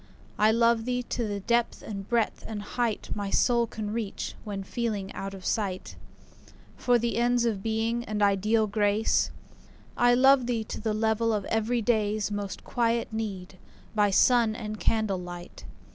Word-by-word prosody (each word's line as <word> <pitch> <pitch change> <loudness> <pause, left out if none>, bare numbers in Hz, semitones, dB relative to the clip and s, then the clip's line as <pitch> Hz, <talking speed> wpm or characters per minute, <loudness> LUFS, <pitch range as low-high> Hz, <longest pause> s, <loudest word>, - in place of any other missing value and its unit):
I 215 +1 +5
love 230 0 +3
thee 250 0 -1
to 235 -1 -3
the 205 -1 -3
depth 235 +3 0
and 195 -2 -7
breadth 235 -2 0
and 210 -2 -5
height 230 +1 -2
My 205 -1 -3
soul 235 +2 +3
can 210 -2 -5
reach, 220 -3 -4
when 200 -2 -5
feeling 210 -2 -3
out 195 0 -5
of 190 - -11
sight 195 -4 -2 0.8
For 245 -1 +3
the 235 0 -1
ends 240 0 +2
of 215 -4 -1
Being 225 +2 -1
and 210 -1 -1
ideal 210 +3 +3
Grace. 210 +1 +1 0.7
I 245 0 +4
love 265 0 +5
thee 235 -3 0
to 215 - -7
the 215 -1 -1
level 220 +1 +1
of 210 -3 -1
everyday's 220 -2 0
Most 205 -1 -4
quiet 235 -1 0
need, 195 -4 -5 0.3
by 210 -2 +3
sun 230 +2 +4
and 215 -2 -6
candlelight. 180 - -2
220 Hz, 160 wpm, -27 LUFS, 205-235 Hz, 0.8 s, I